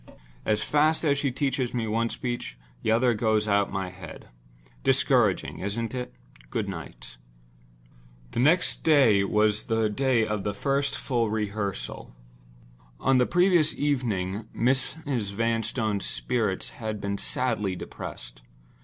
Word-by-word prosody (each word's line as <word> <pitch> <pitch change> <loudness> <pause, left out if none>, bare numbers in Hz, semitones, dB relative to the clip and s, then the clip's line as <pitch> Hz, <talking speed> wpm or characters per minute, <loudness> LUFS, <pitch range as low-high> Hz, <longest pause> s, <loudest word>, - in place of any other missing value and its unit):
As 105 0 +1
fast 155 +2 +2
as 140 -2 +2
she 140 - +1
teaches 130 -1 -1
me 115 -2 0
one 115 +2 0
speech, 120 - -4 0.2
the - - -1
other 120 +2 +3
goes 110 -1 +1
out 100 -1 +3
of - - -13
my 95 -2 -3
head. 90 -3 -11 0.5
Discouraging, 130 -7 +3
isn't 110 +5 -3
it? 125 -1 -4 0.4
Goodnight." - - -6 1.1
The - - -3
next 160 +8 +3
day 135 -11 +5
but 100 - -1
one 105 0 +3
was 105 0 +1
the 110 -1 +1
day 130 -1 +2
of 105 -2 -2
the 100 0 -2
first 140 +5 0
full 120 -4 -1
rehearsal. 105 - -4 0.8
On 135 -1 +3
the 125 - +3
previous 175 -3 +3
evening 110 -8 -1
Mrs. 130 -3 -1
Vanstone's 115 -1 -1
spirits 110 -7 -1
had 110 -1 -3
been 100 0 -3
sadly 110 -7 0
depressed. - - -8
115 Hz, 135 wpm, -26 LUFS, 105-130 Hz, 1.1 s, day